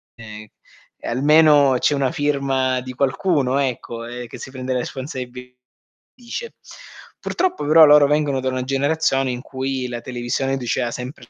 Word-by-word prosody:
ehm, 110 -1 -11 0.5
e - - -7
almeno 145 +1 +4
c'è 145 - +2
una 135 -2 0
firma 135 -3 0
di 130 - -8
qualcuno, 140 0 0
ecco, 120 -3 -3
eh, 120 +1 -7
che - - -10
si 130 - -9
prende 130 -1 -4
le 125 - 0
responsabilità 125 -1 -7 0.6
dice. 255 - -8 0.6
Purtroppo 370 - -2
però 155 +1 +7
loro 150 0 +7
vengono 145 -3 0
da 130 - -1
una 130 -1 -2
generazione 135 -1 0
in 125 - -4
cui 130 -1 -4
la 120 -1 -6
televisione 130 +2 -2
diceva 120 -1 -2
sempre 125 0 -8
130 Hz, 155 wpm, -20 LUFS, 125-145 Hz, 0.6 s, però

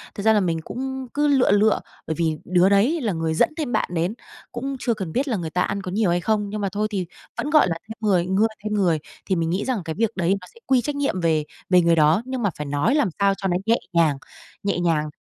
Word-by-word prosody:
Thật 200 - -5
ra 220 - +5
là 210 - +4
mình 165 -4 -1
cũng 265 +5 -5
cứ 295 +1 +2
lựa 270 -7 +4
lựa, 210 +2 +4 0.3
bởi 160 - -1
vì 160 -2 +1
đứa 180 +1 +4
đấy 235 +12 +3
là 215 -6 0
người 160 -1 -1
dẫn 160 - +3
thêm 295 -6 -2
bạn - - 0
đến, 175 +4 0 0.4
cũng 270 +3 -4
chưa 240 - 0
cần 190 -7 -5
biết 270 - 0
là 230 -6 0
người 165 -3 -4
ta 180 - -1
ăn 200 0 -1
có 185 - -6
nhiều 205 -1 +1
hay 175 0 +1
không? 210 0 0
Nhưng 210 0 -4
mà 195 - 0
thôi 210 +3 -1
thì 190 -3 -2 0.3
vẫn, 295 - -2
gọi 305 -6 +5
là, 165 - -1
thêm 220 - -6
người 180 -3 +3
ngưa 195 +4 +2 0.2
thêm 215 0 -2
người, 175 -6 +2 0.3
thì 190 - 0
mình 165 -1 0
nghĩ 185 +4 -1
rằng 255 -6 -1
cái 160 - -3
việc 225 +1 +1
đấy 185 +1 +1
nó 180 - -12
sẽ 230 - -18
quy 260 -2 +4
trách 290 +3 -3
nhiệm 275 -10 -1
về 160 -2 +2 0.3
về 180 -1 +6
người 170 0 +4
đó, 160 +5 +4
nhưng 260 -1 -4
mà 205 - +3
phải 150 - -4
nói 145 - +1
làm 290 -10 +2
sao 200 0 +4
cho 195 - -2
nó 175 - +1
nhẹ 230 +1 +3 0.2
nhàng, 160 -4 +3 0.5
nhẹ 200 -3 0
nhàng, 160 -3 +1
195 Hz, 275 wpm, -23 LUFS, 170-230 Hz, 0.5 s, về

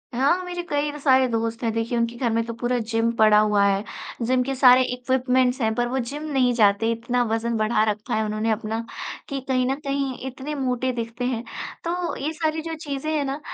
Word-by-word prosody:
हाँ, 285 +9 +2
मेरे 355 -1 -4
कई 290 0 0
सारे 265 -2 +4
दोस्त 230 0 -2
हैं, 230 - +1
देखिए 230 +2 -1
उनके 235 0 0
घर 240 0 0
में 230 +1 +1
तो 230 - -5
पूरा 240 +2 -1
जिम 225 0 +2
पड़ा 215 -2 +5
हुआ 210 -1 +3
है, 200 0 +2 0.4
जिम 255 +1 +2
के 270 +1 -3
सारे 255 -1 +7
इक्विपमेंट्स 255 0 +1
हैं, 220 -1 +2
पर 240 +1 +1
वो 260 +2 -1
जिम 280 +5 -5
नहीं 255 -3 +3
जाते, 220 0 +3
इतना 235 +2 -1
वज़न 230 +1 0
बढ़ा 215 0 +2
रखा 215 +4 -4
है 220 0 +1
उन्होंने 215 +1 -1
अपना 220 +1 -2 0.5
कि 275 -2 -2
कहीं 255 -1 +2
न 265 - +1
कहीं 275 -2 -1
इतने 265 +3 -5
मोटे 255 -2 -1
दिखते 235 +1 -4
हैं, 245 -2 -1 0.4
तो 345 +1 -2
ये 295 +3 -3
सारी 315 0 -1
जो 325 0 -5
चीज़ें 300 -1 -4
हैं 295 - +1
ना, 275 +2 -3
250 Hz, 215 wpm, -24 LUFS, 230-275 Hz, 0.5 s, सारे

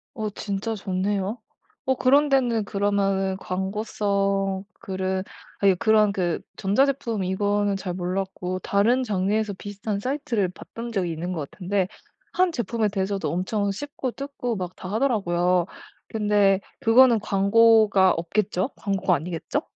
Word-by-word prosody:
어 215 -3 -2
진짜 205 +2 -3
좋네요. 195 +2 -2 0.5
어 265 0 +2
그런 280 +4 +4
데는 240 -6 +2
그러면은 195 -1 0
광고성 195 0 -1 0.2
글은 190 0 -2 0.4
아유 195 -2 +4
그런 215 -2 +4
그 175 -4 -1 0.2
전자제품 235 0 +1
이거는 205 +2 0
잘 190 -2 -4
몰랐고, 185 0 -3
다른 220 +8 +2
장르에서 210 0 0
비슷한 205 +1 -5
사이트를 245 -6 -1
봤던 230 +5 -8
적이 185 -6 -1
있는 175 +3 -4
것 150 -4 -4
같은데 190 0 -1 0.4
1 365 -1 +2
제품에 230 - -1
대해서도 195 0 -2
엄청 200 +3 -1
씹고 265 +2 -4
뜯고 275 -4 -4
막 180 -2 -5
다 185 - -8
하더라고요. 180 -7 +1 0.4
근데 205 -3 +2 0.2
그거는 235 0 +6
광고가 205 -1 +4
없겠죠? 185 +5 -1
광고가 195 -2 0
아니겠죠? 165 +2 -3
200 Hz, 295 characters per minute, -24 LUFS, 190-225 Hz, 0.5 s, 그거는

